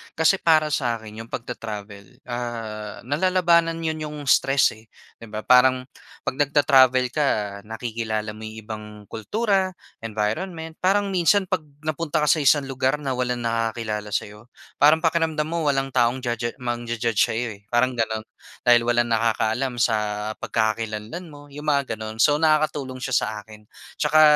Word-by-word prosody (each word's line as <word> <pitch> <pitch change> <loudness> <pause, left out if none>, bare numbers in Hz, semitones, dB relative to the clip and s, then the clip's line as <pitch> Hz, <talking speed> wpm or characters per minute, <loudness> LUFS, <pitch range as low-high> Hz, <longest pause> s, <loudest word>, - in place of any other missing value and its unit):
Kasi 160 +4 +4
para 155 -2 +4
sa 125 -4 +1
akin, 110 -1 -10
yung - - -19
pagta-travel, 105 -5 -7
ah, 115 -3 -5
nalalabanan 170 +3 +2
'yon 160 -1 -1
yung 150 -1 -5
stress, 135 -5 +3
eh, 110 - -20 0.3
'di 115 - -10
ba? 110 0 -5
Parang 125 0 +5 0.4
'pag 130 - -3
nagta-travel 135 -3 +5
ka, 150 -2 +1 0.4
nakikilala 110 -1 -3
mo 110 +1 -9
yung 110 0 -9
ibang 105 0 -7 0.3
kultura, 195 - 0 0.3
environment, 160 - -3
parang 200 +2 +2
minsan 185 +2 +3
'pag 170 -5 -1 0.2
napunta 155 0 -1
ka 150 - +2
sa 160 - +3
isang 145 0 +4
lugar 130 +2 +1
na 135 -2 -2
walang 125 -1 -1
nakakakilala 115 -2 -2
sa'yo, 105 +2 -4 0.3
parang 150 +3 +6
pakiramdam 165 -2 +1
mo 170 -1 -2
walang 135 -1 +1
taong 125 0 +2
ja 120 -1 -1
ja 120 0 -3
mangja-judge 120 -2 -2
sa'yo, 120 +2 -2
eh, - - -26
parang 125 +1 +2
gano'n. 110 -1 -1 0.4
Dahil 120 -1 +5
walang 120 0 +2
nakakaalam 115 +2 0
sa 115 -3 +3 0.4
pagkakakilanlan 110 +7 -2
mo, 145 -2 -13
yung 150 +2 -9
mga 140 -6 0
gano'n. 110 +1 -4
So, 145 -1 +5
nakakatulong 150 -4 +1
siya 135 0 -1
sa - - 0
akin 105 0 -15 0.3
'tsaka 155 +1 +4
125 Hz, 155 wpm, -23 LUFS, 110-155 Hz, 0.4 s, parang